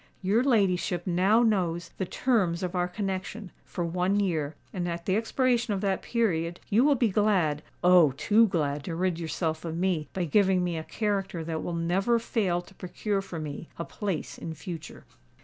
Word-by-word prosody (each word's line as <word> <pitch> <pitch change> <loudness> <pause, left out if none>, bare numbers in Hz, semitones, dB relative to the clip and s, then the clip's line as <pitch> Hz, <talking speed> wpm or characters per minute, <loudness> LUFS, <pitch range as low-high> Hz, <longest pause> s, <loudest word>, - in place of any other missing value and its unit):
Your 210 +6 +3
ladyship 190 -8 +1
now 190 +6 +3
knows 175 -6 +1
the 190 - -1
terms 190 -9 +1
of 180 0 -2
our 180 -1 +1
connexion, 190 +1 -4
for 175 - -3
one 180 +4 +1
year; 160 -7 -1 0.2
and 175 -2 -2
at 170 0 -5
the 190 - +1
expiration 240 0 +1
of 190 - -3
that 195 -2 0
period 175 -8 0
you 220 +5 +5
will 290 0 +5
be 235 -3 +2
glad—Oh! 180 -4 +3
too 220 +7 +4
glad 150 -6 -1
to 165 - -3
rid 180 -1 0
yourself 160 -1 -2
of 165 -1 -4
me 175 -4 0
by 185 -2 -2
giving 185 +2 +3
me 175 -1 -1
a 160 - -3
character 195 -4 -2
that 160 0 -3
will 175 - -3
never 185 +8 +2
fail 195 -6 0
to 195 - -17
procure 195 +2 -2
for 190 -3 -7
me 155 +1 -6
a 170 - -4
place 195 -7 -4
in 160 -1 -6
future." 165 -2 -8
180 Hz, 185 wpm, -28 LUFS, 170-205 Hz, 0.2 s, you